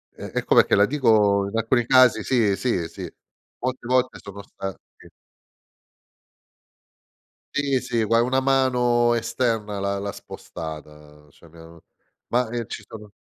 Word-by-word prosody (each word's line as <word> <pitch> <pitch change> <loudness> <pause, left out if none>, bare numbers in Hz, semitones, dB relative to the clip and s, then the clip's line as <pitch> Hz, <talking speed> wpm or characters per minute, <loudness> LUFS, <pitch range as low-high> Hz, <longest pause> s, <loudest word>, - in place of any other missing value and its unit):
è - - -15
è - - -2
come - - +5
che - - +2
la 100 - +5
dico 105 -7 +2
in 115 - -3
alcuni 115 +2 +1
casi, 125 -3 +5
sì, 110 -6 +2
sì, 95 -8 -1
sì. - - -9 0.5
Molte 130 -1 -4
volte 130 0 +1
sono 100 0 -10
stati 95 -1 -7 2.8
Sì, 140 -2 0
sì, 115 -1 -1
gua 115 +2 +3
una 130 +2 +1
mano 125 -3 +2
esterna 115 -3 -2
l'ha 100 0 -2
l'ha 100 0 -4
spostata, 75 -3 -10
cioè 85 - -20
mi 85 - -18
hanno 80 0 -15 0.4
ma 125 0 0
eh, 120 -2 -4
ci 105 - -7
sono 105 -2 -11
115 Hz, 145 wpm, -23 LUFS, 100-125 Hz, 2.8 s, come